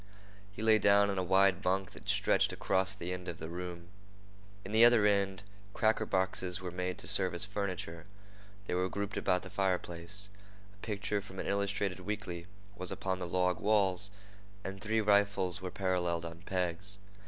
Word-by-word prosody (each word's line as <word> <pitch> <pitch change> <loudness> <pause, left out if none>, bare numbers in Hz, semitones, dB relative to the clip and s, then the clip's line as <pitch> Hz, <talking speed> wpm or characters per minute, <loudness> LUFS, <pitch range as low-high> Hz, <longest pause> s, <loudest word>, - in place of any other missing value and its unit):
He 105 +2 -7
lay 110 -1 +5
down 100 0 +5
on 95 - -1
a - - 0
wide 95 0 +4
bunk 95 +1 0
that - - -10
stretched - - +3
across 95 0 0
the 90 +1 -4
end 90 0 -6
of 85 - -4
the 80 - -7
room. 85 0 -6 0.8
In 95 - -6
the 110 +2 +6
other 120 -3 +7
end, 100 -2 +2 0.3
cracker 110 0 +2
boxes 95 -1 0
were 90 -1 -5
made 90 0 -3
to - - -5
serve 95 -3 +5
as 85 - +2
furniture. 95 -5 -4 0.6
They - - -3
were 90 +1 +1
grouped 100 0 -3
about 90 -1 +1
the 95 - -9
fireplace. 95 +1 -2 0.4
A - - -23
picture 105 -1 -2
from 95 -1 -11
an - - -3
illustrated 100 -1 -1
weekly 90 -3 -5 0.3
was 90 -2 -4
upon 95 -1 -2
the 90 - -3
log 90 +1 +1
walls, 100 -2 +2 0.5
and 95 0 -6
three 110 +1 +1
rifles 100 -3 +2
were 95 - -4
paralleled 90 -3 -1
on 85 0 -8
pegs. 95 +2 -2
95 Hz, 175 wpm, -32 LUFS, 90-100 Hz, 0.8 s, other